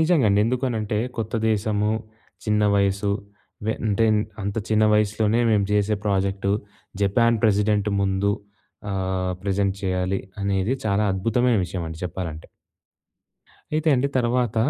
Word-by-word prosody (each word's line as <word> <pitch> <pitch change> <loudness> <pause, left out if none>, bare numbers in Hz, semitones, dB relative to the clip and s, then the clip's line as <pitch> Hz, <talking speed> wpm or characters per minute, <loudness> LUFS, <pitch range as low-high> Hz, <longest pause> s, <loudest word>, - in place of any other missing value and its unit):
నిజంగండి. 140 - +3
ఎందుకనంటే 115 -4 -1 0.2
కొత్త 115 +1 -3 0.2
దేశము, 105 0 0 0.5
చిన్న 105 -1 +2
వయసు 100 0 +1 0.6
వెంటేన్ 110 0 +1 0.2
అంత 100 +2 -3
చిన్న 110 0 +3
వయసులోనే 105 +2 +2
మేము 105 -2 +3
జేసే 105 0 +2
ప్రాజెక్టు. 100 0 0 0.5
జపాన్ 115 +3 +3
ప్రెసిడెంట్ 105 0 +2
ముందు 95 +1 +1 0.6
ఆహ్, 95 -1 -1
ప్రెసెంట్ 100 0 0
చేయాలి 95 0 0 0.2
అనేది 100 +3 0
చాలా 105 0 +2
అద్భుతమైన 115 +5 +2
విషయమండి 85 -2 -5
చెప్పాలంటే. 85 -3 -5 1.3
అయితే 155 +1 +1
అండి 135 +3 +1
తర్వాత, 120 -1 0
105 Hz, 110 wpm, -23 LUFS, 95-110 Hz, 1.3 s, నిజంగండి